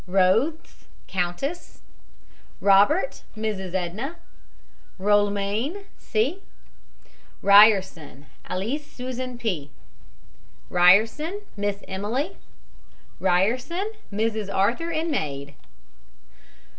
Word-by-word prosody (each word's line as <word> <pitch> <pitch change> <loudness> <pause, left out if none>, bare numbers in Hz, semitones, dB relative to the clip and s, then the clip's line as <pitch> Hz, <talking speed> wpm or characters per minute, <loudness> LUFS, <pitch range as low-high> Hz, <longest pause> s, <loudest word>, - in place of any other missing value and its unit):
ROTHES, 195 - +1 0.2
COUNTESS. 190 - -3 0.8
ROBERT, 205 - +3 0.2
MRS. 195 -4 -3
EDNA. 195 - -3 0.8
ROLMANE, 205 - 0
C. 260 - -1 1.0
RYERSON, 195 -8 +5 0.2
ALISS 230 +11 -2
SUSAN 255 0 -5
P. 180 -12 -3 1.0
RYERSON, 220 - +4
MISS 200 0 -3
EMILY. 230 - -3 0.8
RYERSON, 250 - +1 0.2
MRS. 215 -1 -1
ARTHUR, 235 +13 +1
and 325 0 -1
maid. 140 - -3
210 Hz, 70 wpm, -24 LUFS, 190-275 Hz, 1.0 s, RYERSON